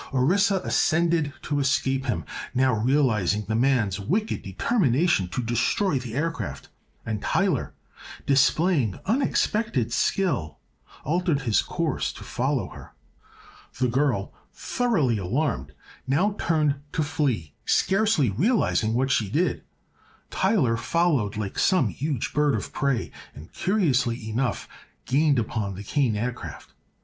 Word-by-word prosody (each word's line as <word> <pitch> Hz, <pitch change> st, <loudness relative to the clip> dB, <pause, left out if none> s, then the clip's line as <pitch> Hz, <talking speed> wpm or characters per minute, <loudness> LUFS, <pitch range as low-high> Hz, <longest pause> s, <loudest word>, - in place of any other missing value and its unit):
Orissa 190 Hz, +10 st, +3 dB
ascended 165 Hz, -2 st, +2 dB
to 145 Hz, -1 st, -1 dB
escape 135 Hz, -1 st, +1 dB
him, 85 Hz, -, -1 dB, 0.3 s
now 130 Hz, 0 st, +3 dB
realizing 110 Hz, -5 st, +1 dB
the 110 Hz, -, -1 dB
man's 115 Hz, -5 st, +1 dB
wicked 200 Hz, -, -1 dB
determination 135 Hz, -, +1 dB
to 120 Hz, +8 st, -3 dB
destroy 125 Hz, -, +1 dB
the 120 Hz, -2 st, -7 dB
aircraft, 125 Hz, -, -3 dB, 0.4 s
and 110 Hz, -2 st, -3 dB
Tyler, 190 Hz, -9 st, 0 dB, 0.5 s
displaying 140 Hz, -, +2 dB
unexpected 215 Hz, -, 0 dB
skill, 120 Hz, -, 0 dB, 0.5 s
altered 165 Hz, -1 st, 0 dB
his 115 Hz, -5 st, +2 dB
course -, -, -2 dB
to -, -, -10 dB
follow -, -, -1 dB
her. -, -, -13 dB, 0.8 s
The 125 Hz, -1 st, +2 dB
girl, 125 Hz, -6 st, 0 dB, 0.2 s
thoroughly 165 Hz, -, 0 dB
alarmed, 130 Hz, -, -1 dB, 0.4 s
now 180 Hz, +10 st, +2 dB
turned 155 Hz, -4 st, +1 dB, 0.2 s
to 155 Hz, -, +1 dB
flee, 135 Hz, -, -1 dB
scarcely 195 Hz, -, +2 dB
realizing 120 Hz, -, +1 dB
what 130 Hz, +2 st, +1 dB
she 105 Hz, -6 st, +1 dB
did. 160 Hz, -, 0 dB, 0.7 s
Tyler 175 Hz, -, +2 dB
followed 130 Hz, -, 0 dB
like 105 Hz, -2 st, -4 dB
some 170 Hz, -, +3 dB
huge 135 Hz, -, -3 dB
bird 150 Hz, -1 st, +2 dB
of -, -, -5 dB
prey 140 Hz, -4 st, -1 dB, 0.2 s
and, 75 Hz, +3 st, -12 dB
curiously 130 Hz, -, 0 dB
enough, 120 Hz, 0 st, -1 dB, 0.4 s
gained 145 Hz, +1 st, +2 dB
upon 110 Hz, -4 st, -2 dB
the 100 Hz, -, -7 dB
Kane 125 Hz, 0 st, 0 dB
Aircraft. 120 Hz, +3 st, -5 dB
135 Hz, 120 wpm, -25 LUFS, 110-165 Hz, 0.8 s, Orissa